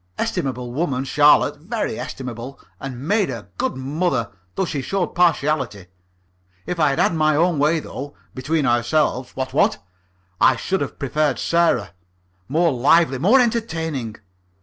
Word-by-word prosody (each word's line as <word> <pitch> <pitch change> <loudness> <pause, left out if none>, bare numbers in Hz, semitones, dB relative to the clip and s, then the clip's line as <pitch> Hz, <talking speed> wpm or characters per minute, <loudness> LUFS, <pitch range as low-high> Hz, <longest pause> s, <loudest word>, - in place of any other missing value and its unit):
Estimable 125 -2 -2
woman, 135 -3 -1
Charlotte, 145 +1 +4
very 220 +5 -3
estimable, 125 +1 -7 0.2
and 135 +1 -7
made 205 -2 +2
a 115 -6 -7
good - - -1
mother, 135 - -1 0.2
though 190 - 0
she 150 -5 -3
showed 190 +5 -2
partiality. 150 - +1 0.8
If 180 - -4
I'd 145 -3 +3
had - - +2
my 155 -1 +2
own 165 0 +2
way 155 +3 +3
though 145 +1 -8 0.2
between 145 +3 -1
ourselves, 125 +2 +1
what, 130 0 -4
what? 140 - +3 0.6
I 130 - +5
should 190 +9 -2
have 140 - -4
preferred 145 +1 0
Sarah. 170 - +1 0.6
More 165 +4 +2
lively, 135 +2 +3
more 210 - +5
entertaining. 160 - -1
145 Hz, 140 wpm, -21 LUFS, 130-170 Hz, 0.8 s, I